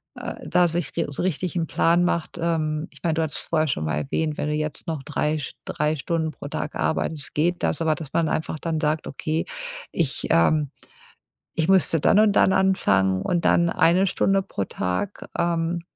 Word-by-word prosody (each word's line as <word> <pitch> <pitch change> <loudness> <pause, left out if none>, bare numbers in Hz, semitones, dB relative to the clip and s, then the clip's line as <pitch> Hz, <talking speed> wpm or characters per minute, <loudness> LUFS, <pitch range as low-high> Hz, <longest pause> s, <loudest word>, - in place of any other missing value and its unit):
äh, - - -6
da 180 0 +4
sich 170 0 -3
ri - - +1
so 145 - -4
richtig 185 0 -1
'n 165 - +1
Plan 170 +1 +3
macht. 170 0 -1
Ähm, 155 -2 0
ich - - -14
mein, 165 -2 +1
du 160 - +1
hattest 155 - -3
vorher 155 -1 +2
schon 80 - -1
mal 75 -1 -1
erwähnt, 150 - -1
wenn - - -2
du - - 0
jetzt 150 -1 -3
noch 160 -4 -3
drei 150 +1 -1
sch 140 - -6
drei 150 +1 0
Stunden 160 +3 -1
pro 145 - -9
Tag 150 - -4
arbeitest, 155 -2 -2
geht 175 +4 +1
das. 160 - 0
Aber, 160 -1 +2
dass 155 -4 -9
man 165 -2 +2
einfach 155 0 -2
dann 165 -1 -2
sagt: 155 0 0
„Okay, 155 +4 -2 0.5
ich, 155 -6 -1
ähm, 145 - +3 0.9
ich 160 +1 +1
müsste 185 -4 +4
dann 200 - +4
und 215 -1 +5
dann 190 - +4
anfangen 100 - +2
und 175 -2 0
dann 170 0 +4
eine 180 +3 +3
Stunde 195 +1 +2
pro 100 - -3
Tag“, 95 - -3
ähm, 170 0 0
160 Hz, 200 wpm, -24 LUFS, 150-170 Hz, 0.9 s, und